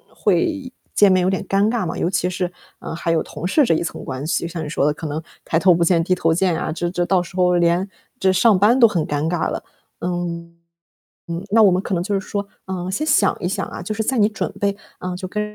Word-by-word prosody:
会 300 -8 0 0.2
见 205 -2 +5
面 185 -1 +3
有 185 - +2
点 190 0 -1
尴 200 +2 +2
尬 230 -5 -1
嘛。 165 - -4
尤 170 - 0
其 180 -1 0
是， 180 -1 -2 0.3
嗯， - - -6
还 165 - -1
有 165 -1 +2
同 150 +4 -7
事 295 +9 +4
这 165 - +3
一 160 - 0
层 170 - -5
关 130 +2 -5
系， 170 - 0
像 165 -2 -5
你 - - -5
说 150 -2 0
的 150 - +2
可 160 0 -6
能 150 +2 -3 0.2
抬 165 - +1
头 185 -1 +5
不 170 - +2
见 170 -1 +3
低 185 - +1
头 165 -2 +2
见 175 -1 +1
啊， 155 - -2
这 175 +1 -2
这 175 0 -1
到 185 0 +2
时 180 - -13
候 180 -1 +3
连 175 +2 +2 0.3
这 190 0 +3
上 200 +1 +4
班 230 +6 +4
都 230 - +8
很 175 -7 -1
尴 145 +2 -1
尬 175 -2 0
了。 - - -4 0.4
嗯， 170 -1 -4 0.7
嗯， 170 +2 -4
那 225 0 +6
我 195 - +6
们 185 +1 +1
可 195 - -4
能 175 0 0
就 200 0 0
是 - - -11
说， 200 -1 -3 0.2
嗯， 185 0 -4
先 305 +11 -1
想 215 -10 +3
一 175 - -2
想 195 +1 -2
啊， - - -7
就 215 +4 -3
是 220 - -1
在 260 +2 0
你 210 -1 +5
准 215 - -3
备， 200 0 +1 0.2
嗯， 180 0 -4
就 185 0 -5
跟 210 +2 -3
180 Hz, 285 characters per minute, -21 LUFS, 170-200 Hz, 0.7 s, 都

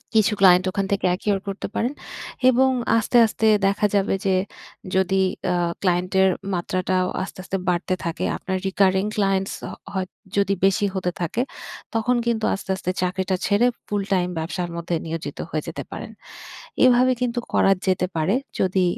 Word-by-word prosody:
কিছু 215 0 +4
ক্লায়েন্ট 185 -1 +6
ওখান 195 0 -1
থেকে 200 - 0
acquire 195 +1 -1
করতে 195 0 -4
পারেন 245 +4 0 0.6
এবং 260 +1 +4 0.3
আস্তে, 230 +2 +2
আস্তে 220 0 0 0.2
দেখা 200 +2 +1
যাবে 200 0 +2
যে 190 -1 +3 0.6
যদি 190 0 +2 0.3
আ - - +1 0.3
ক্লায়েন্টের 185 +1 +2 0.2
মাত্রাটাও 185 +1 0 0.2
আস্তে, 190 - -9
আস্তে 195 0 -2
বাড়তে 180 +2 0
থাকে। 170 0 -3
আপনার 190 0 -3
recurring 190 0 +2
clients 195 -1 +1
হ - - -5 0.3
হয় 190 -1 -2 0.3
যদি 200 -1 +3
বেশি 195 +1 +3
হতে 180 -1 -1
থাকে, 175 +8 -1 0.5
তখন 225 +3 +2
কিন্তু 230 -2 0
আস্তে, 195 - -6
আস্তে 185 -1 -2
চাকরিটা 185 +1 0
ছেড়ে 210 +4 +3 0.2
ফুল 205 -1 -1
টাইম 180 -2 +2
ব্যবসার 175 +2 -3
মধ্যে 170 0 -2
নিয়োজিত 160 -3 -5
হয়ে 155 -1 -2
যেতে - - -5
পারেন। - - -7 0.7
এভাবে 255 0 +5
কিন্তু 245 -1 -1
করা 195 - +4
যেতে 185 -1 +2
পারে। 160 +6 +1 0.3
যদি 185 0 +2
190 Hz, 160 wpm, -23 LUFS, 185-205 Hz, 0.7 s, ক্লায়েন্ট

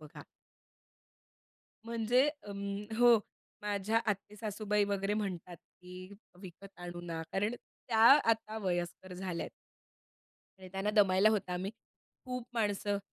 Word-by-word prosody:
बघा. 150 -1 -11 1.6
म्हणजे 235 +3 +2
अं 205 -5 -5
हो, 240 -1 +7 0.4
माझ्या 210 +2 +1
आत्ते 210 0 -2
सासूबाई 210 -1 0
वगैरे 200 0 0
म्हणतात, 180 -4 -4
की 180 +3 -12 0.3
विकत 190 +1 -11
आणू 175 0 -6
ना 165 -1 -4
कारण, 210 +4 0 0.3
त्या 225 - +1 0.3
आता 220 -1 +1
वयस्कर 180 -1 -3
झाल्या 180 -2 -3
आहेत - - -8 1.1
आणि 185 -1 -11
त्यांना 195 +2 0
दमायला 200 -1 +5
होतं, 200 -4 -1
आम्ही 185 +2 -2 0.5
खूप 250 -2 -4
माणसं 205 -2 0
200 Hz, 120 wpm, -33 LUFS, 185-215 Hz, 1.6 s, हो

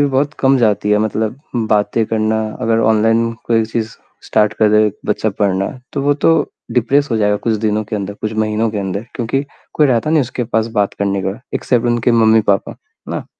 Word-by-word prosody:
भी 145 - +4
बहुत 145 +2 +1
कम 135 0 +4
जाती 105 -3 +1
है, 105 - +4
मतलब 110 +2 -2 0.3
बातें 105 +2 +1
करना, 110 0 0 0.2
अगर 115 0 +1
ऑनलाइन 115 +1 +2
कोई 115 -1 +2
चीज़ 110 0 -3 0.4
स्टार्ट 105 -1 +2
कर 110 - +4
दे 105 0 +5
एक 105 0 -5
बच्चा 110 - 0
पढ़ना, 100 -1 0 0.2
तो 140 - -2
वो 145 +1 +2
तो 165 - +6 0.4
डिप्रेस 135 +4 +2
हो 115 - +1
जाएगा 105 -1 +2
कुछ 110 +2 -1
दिनों 105 0 0
के 105 +1 -4
अंदर, 100 0 -4
कुछ 110 +1 -4
महीनों 110 +1 0
के 105 - -4
अंदर। 100 +2 -4
क्योंकि 125 +3 -1 0.3
कोई 150 - +4
रहता 130 +3 +1
नहीं 160 -1 +4
उसके 125 -1 -3
पास 110 -1 0
बात 100 - 0
करने 100 -1 -1
का, 95 +5 -4
एक्सेप्ट 120 -2 0
उनके 120 0 +1
मम्मी 110 -1 +5
पापा, 100 - -2
है - - -12
ना? - - -6
110 Hz, 210 wpm, -17 LUFS, 105-120 Hz, 0.4 s, तो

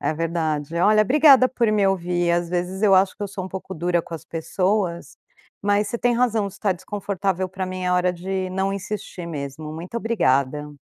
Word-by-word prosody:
É 155 - -1
verdade. 160 -2 -2
Olha, 215 +4 +5
obrigada 270 +1 +6
por 235 -4 +1
me 205 -2 +3
ouvir. 175 -2 0
Às 170 0 +1
vezes 180 +3 -3
eu 200 -2 +6
acho 190 0 +3
que - - -7
eu 200 - -2
sou 190 -1 -6
um - - -6
pouco 190 0 -7
dura 175 +1 0
com 170 - -8
as 160 0 -8
pessoas, 180 +2 -2 0.5
mas 205 0 +2
você 235 - -3
tem 245 -1 +2
razão. 225 -5 +1
Se 195 0 -15
tá 200 -3 +2
desconfortável 190 0 -3
pra 185 0 -4
mim, 185 0 -5
é 180 - +1
hora 180 0 +2
de 185 +1 -3
não 190 +1 -1
insistir 195 -3 -5
mesmo. 150 0 -6
Muito 175 +8 -7
obrigada. 150 - 0
185 Hz, 205 wpm, -23 LUFS, 170-205 Hz, 0.5 s, obrigada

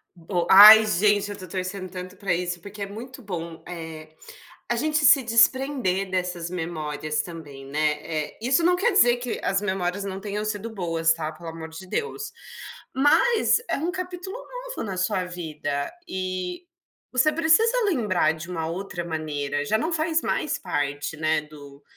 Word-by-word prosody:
Bo 175 0 -3
ai 215 +2 +11
gente, 205 +1 +2
eu - - -4
estou 190 -2 -10
torcendo 185 +1 -4
tanto 185 +1 -8
para 190 -2 -1
isso, 175 0 -2
porque 200 +2 -10
é - - -1
muito 245 +6 -9
bom, 170 -5 -6
eh, 160 -3 -8 0.6
a 240 - +1
gente 300 +5 0
se 270 +1 +8
desprender 230 -4 +2
dessas 180 -2 -2
memórias 155 -3 -3
também, 150 -6 -10
né. 150 +2 0
Eh, 155 -2 -4
isso 260 +8 +2
não 360 +1 +4
quer 425 +7 +2
dizer 245 -11 +5
que 245 -1 -4
as 195 +1 +1
memórias 190 -1 -2
não 190 -1 -5
tenham 205 +1 -4
sido 215 +1 -3
boas 165 -4 +1
tá, 160 -1 -4
pelo 165 +1 -9
amor 160 0 -8
de 160 +4 -10
Deus. 430 - -3 0.6
Mas 430 - +4
é - - 0
um 330 +5 -2
capítulo 365 +3 -6
novo - - -7
na 195 -4 -5
sua 185 0 0
vida, 155 -5 -4 0.2
e 185 - -4 0.5
você 260 +5 +3
precisa 440 +11 +3
lembrar 210 - +2
de 160 +2 -9
uma 165 -3 -3
outra 175 +1 -5
maneira, 145 -3 -3
já 215 +9 +1
não 320 +9 -2
faz 320 0 +1
mais 305 - -1
parte, 145 +1 -3
né, 155 0 +1
do 145 -2 -14
185 Hz, 170 wpm, -24 LUFS, 165-240 Hz, 0.6 s, ai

